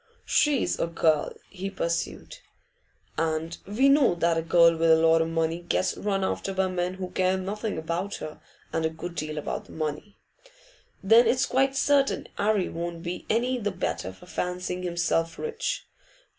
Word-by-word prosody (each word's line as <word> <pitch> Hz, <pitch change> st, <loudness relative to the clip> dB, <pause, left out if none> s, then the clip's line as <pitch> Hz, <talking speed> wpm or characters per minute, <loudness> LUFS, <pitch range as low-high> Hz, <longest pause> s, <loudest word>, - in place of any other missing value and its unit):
'She's 290 Hz, -4 st, +2 dB
a -, -, +1 dB
girl,' 160 Hz, -2 st, +1 dB, 0.2 s
he 195 Hz, 0 st, -5 dB
pursued, 170 Hz, -3 st, -3 dB, 0.8 s
'and 160 Hz, +1 st, -1 dB
we 230 Hz, +7 st, +3 dB
know 275 Hz, -8 st, +5 dB
that 170 Hz, 0 st, +2 dB
a 165 Hz, -, +1 dB
girl 170 Hz, 0 st, +5 dB
with 165 Hz, 0 st, +2 dB
a 160 Hz, -, +8 dB
lot 165 Hz, 0 st, +4 dB
o' 160 Hz, -, 0 dB
money 165 Hz, 0 st, 0 dB
gets 180 Hz, +1 st, 0 dB
run 195 Hz, -2 st, -1 dB
after 195 Hz, 0 st, -2 dB
by 190 Hz, 0 st, +2 dB
men 180 Hz, 0 st, -2 dB
who 185 Hz, -1 st, -6 dB
care 185 Hz, 0 st, +1 dB
nothing 205 Hz, +2 st, -3 dB
about 170 Hz, +5 st, -3 dB
her 155 Hz, -, -8 dB, 0.3 s
and 165 Hz, -, 0 dB
a 160 Hz, -, +2 dB
good 165 Hz, +2 st, -7 dB
deal 155 Hz, -2 st, -4 dB
about 150 Hz, -, -4 dB
the -, -, -15 dB
money. 155 Hz, +6 st, -4 dB, 0.9 s
Then 225 Hz, +5 st, +6 dB
it's 260 Hz, +2 st, +3 dB
quite 270 Hz, +1 st, +1 dB
certain 280 Hz, 0 st, +2 dB
'Arry 205 Hz, -2 st, +2 dB
won't 170 Hz, 0 st, -5 dB
be 175 Hz, 0 st, -5 dB
any 245 Hz, +3 st, +1 dB
the 205 Hz, -2 st, -1 dB
better 95 Hz, -, -3 dB
for 95 Hz, -, -16 dB
fancying 180 Hz, +1 st, -3 dB
himself 170 Hz, -2 st, 0 dB
rich. 460 Hz, +1 st, -3 dB
180 Hz, 170 wpm, -26 LUFS, 165-205 Hz, 0.9 s, a